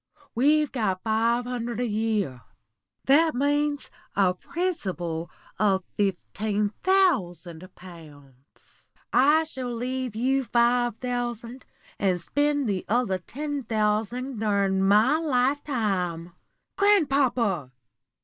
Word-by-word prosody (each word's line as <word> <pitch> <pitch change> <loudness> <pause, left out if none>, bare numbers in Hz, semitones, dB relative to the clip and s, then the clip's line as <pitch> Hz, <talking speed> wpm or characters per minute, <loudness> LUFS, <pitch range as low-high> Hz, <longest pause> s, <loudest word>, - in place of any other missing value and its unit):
We've 295 +4 +3
got 205 -7 -1
five 230 +2 +1
hundred 240 -2 -4
a 245 - 0
year; 210 - -1 0.6
that 310 +3 +4
means 290 +1 0 0.2
a 190 -2 +3
principal 180 - -3 0.3
of 195 -2 +2
fifteen 205 +1 -1
thousand 185 - +1
pounds. 145 -7 -16 0.3
I 295 +5 +5
shall 260 -6 -6
leave 250 0 -3
you 265 +4 +1
five 240 -1 +2
thousand, 245 0 -4 0.3
and 185 -3 +1
spend 290 +8 0
the 195 -3 -1
other 215 -5 +1
ten 290 - -5
thousand 225 +2 -1
during 200 -3 +1
my 215 +10 +4
lifetime." 240 - -1 0.5
"Grandpapa!" 270 - +2
235 Hz, 100 wpm, -25 LUFS, 195-270 Hz, 0.6 s, I